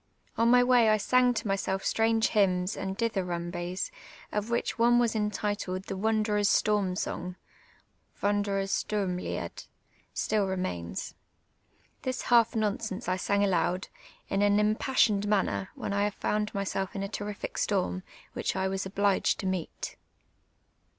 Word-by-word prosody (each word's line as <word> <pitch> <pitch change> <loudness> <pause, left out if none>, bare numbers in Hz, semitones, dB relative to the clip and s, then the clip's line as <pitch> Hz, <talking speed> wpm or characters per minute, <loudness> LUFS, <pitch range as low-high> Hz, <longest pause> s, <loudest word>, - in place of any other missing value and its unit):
On 230 +1 +3
my 245 0 +6
wav 245 -3 +5
I 215 - +5
san)' 250 +4 +3
to - - -2
mvsclf 195 -1 -1
stranj^e 225 0 +2
hvnms 185 -3 +2
and 190 0 -4
dithvnnnbics, 180 -4 -2 0.4
of 210 +2 -2
which 235 0 -1
one 240 +1 +5
entitled 205 -3 -2
"The 195 - -5
Wanderer's 210 0 +1
Slonn 205 -3 +2
sonj;" 180 0 -3 0.9
{Wati' 205 0 +3
dcrers 195 -1 0
ISturmlit'd) 190 -4 -3 0.4
still 210 -2 0
remains. 180 - -3 0.9
This 255 0 -3
half 235 -2 +4
nonsense 220 0 -2
I 185 - +2
sang 200 +2 +1
aloud, 185 -1 +1 0.4
in 195 - 0
an 205 0 +4
imj)assi()ned 210 -1 +2
manner, 145 - +1
when 200 - -4
I 200 +1 +2
found 210 +1 -1
myself 195 -1 -2
in 195 - -2
a - - -2
terrific 205 0 -5
storm, 185 -2 0 0.3
which - - -2
I 190 0 0
was 190 0 -2
ohlij^ed 200 0 +2
to - - -5
meet. 185 -3 -3
200 Hz, 135 wpm, -29 LUFS, 190-215 Hz, 0.9 s, my